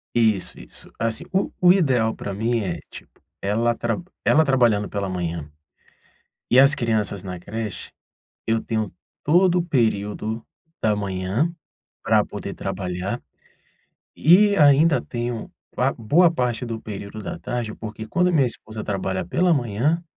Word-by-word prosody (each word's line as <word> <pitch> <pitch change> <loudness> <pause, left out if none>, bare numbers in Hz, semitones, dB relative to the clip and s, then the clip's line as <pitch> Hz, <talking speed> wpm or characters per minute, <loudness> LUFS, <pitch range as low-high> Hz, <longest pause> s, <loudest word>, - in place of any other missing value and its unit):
Isso, 110 -5 +1
isso. - - -11
Assim, 115 -1 -1
o 190 +1 0
o 180 -1 +7
ideal 130 - +2
pra 100 - -6
mim 115 +4 0
é, 90 -4 -3
tipo, - - -14 0.2
ela 115 +4 +1
trab 120 +8 -2 0.2
ela 160 - +5
trabalhando 120 -7 +2
pela 100 -1 -2
manhã, 85 -4 -4 1.0
e 125 - +4
as 135 +1 +7
crianças 110 -6 -1
na 90 -2 -5
creche, 110 +3 -6 0.6
eu 115 0 +1
tenho 110 -4 -2 0.3
todo 180 +3 +4
o - - 0
período 110 - -1 0.4
da 105 -1 +2
manhã 100 - -1 0.5
pra - - +4
poder - - -6
trabalhar 95 +5 -4 1.0
e 200 +6 +5
ainda 145 +1 +5
tenho 120 -2 -4 0.2
pa - - +2
boa 165 +10 +4
parte 125 -6 -1
do 115 -1 -4
período 105 0 -7
da - - -5
tarde, 120 -3 -3
porque 110 0 -7
quando 175 +10 +2
a - - +1
minha 150 -6 +4
esposa 110 -2 -7
trabalha 95 -2 -2
pela 175 - +2
manhã, 135 - 0
115 Hz, 145 wpm, -23 LUFS, 100-140 Hz, 1.0 s, o